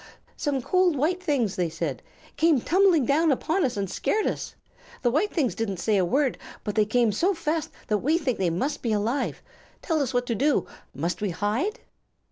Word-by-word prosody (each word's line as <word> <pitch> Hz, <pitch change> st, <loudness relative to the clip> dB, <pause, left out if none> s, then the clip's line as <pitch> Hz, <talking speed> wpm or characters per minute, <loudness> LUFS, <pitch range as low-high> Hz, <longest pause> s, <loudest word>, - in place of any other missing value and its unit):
"Some 275 Hz, -4 st, -1 dB
cold 365 Hz, 0 st, +3 dB
white 330 Hz, +7 st, 0 dB
things," 275 Hz, -, 0 dB
they 175 Hz, -2 st, 0 dB
said, 160 Hz, -5 st, -4 dB, 0.3 s
"came 320 Hz, -3 st, +4 dB
tumbling 355 Hz, -1 st, +3 dB
down 310 Hz, +5 st, +3 dB
upon 325 Hz, +7 st, 0 dB
us 250 Hz, -4 st, -1 dB
and 200 Hz, -1 st, -1 dB
scared 425 Hz, -, 0 dB
us. -, -, -3 dB, 0.5 s
The 240 Hz, -, +3 dB
white 350 Hz, -, +1 dB
things 280 Hz, -9 st, 0 dB
didn't 200 Hz, -4 st, -3 dB
say 215 Hz, +4 st, +1 dB
a 190 Hz, -, +3 dB
word, 270 Hz, +9 st, +1 dB, 0.2 s
but 210 Hz, -, -3 dB
they 215 Hz, 0 st, +3 dB
came 230 Hz, +1 st, +2 dB
so 365 Hz, -, +1 dB
fast 320 Hz, -1 st, -2 dB, 0.2 s
that 210 Hz, -1 st, +1 dB
we 305 Hz, +8 st, +2 dB
think 275 Hz, -8 st, -2 dB
they 185 Hz, -2 st, +2 dB
must 260 Hz, -, -2 dB
be 230 Hz, -3 st, 0 dB
alive. 220 Hz, +7 st, -1 dB, 0.4 s
Tell 320 Hz, -3 st, +1 dB
us 265 Hz, -, -1 dB
what 245 Hz, -1 st, 0 dB
to 240 Hz, -, -1 dB
do. 280 Hz, +7 st, +2 dB, 0.3 s
Must 170 Hz, +8 st, -2 dB
we 205 Hz, -, 0 dB
hide?" 215 Hz, -, -1 dB
260 Hz, 200 wpm, -26 LUFS, 210-320 Hz, 0.5 s, came